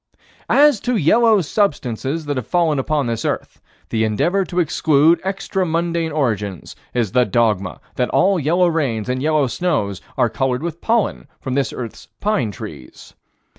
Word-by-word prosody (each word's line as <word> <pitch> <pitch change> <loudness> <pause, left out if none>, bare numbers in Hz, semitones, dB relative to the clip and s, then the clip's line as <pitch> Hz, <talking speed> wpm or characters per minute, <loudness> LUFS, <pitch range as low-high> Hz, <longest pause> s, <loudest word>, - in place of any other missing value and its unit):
As 290 -5 +5
to 250 +3 -1
yellow 215 +5 +4
substances 150 - -1
that 145 -1 -2
have 130 -4 -4
fallen 165 -5 +1
upon 145 +1 0
this 115 -1 -2
earth, - - -3 0.3
the 110 -1 0
endeavor 170 - +1
to 180 +1 -2
exclude 160 0 +3
extra 190 0 -2
mundane 165 -1 -1
origins 105 - -2 0.2
is 115 -6 -1
the 125 +2 +4
dogma 105 -4 0 0.2
that 125 - +1
all 195 -1 +3
yellow 170 +5 +2
rains 130 -10 -1
and 130 0 -1
yellow 155 -1 +2
snows 125 - -1 0.2
are - - +3
colored 125 +4 -1
with 170 -1 -5
pollen 230 -2 0
from 130 - -4
this 140 0 0
earth's 120 -3 -7
pine 195 - 0
trees. 75 -9 -10
150 Hz, 160 wpm, -19 LUFS, 120-175 Hz, 0.3 s, As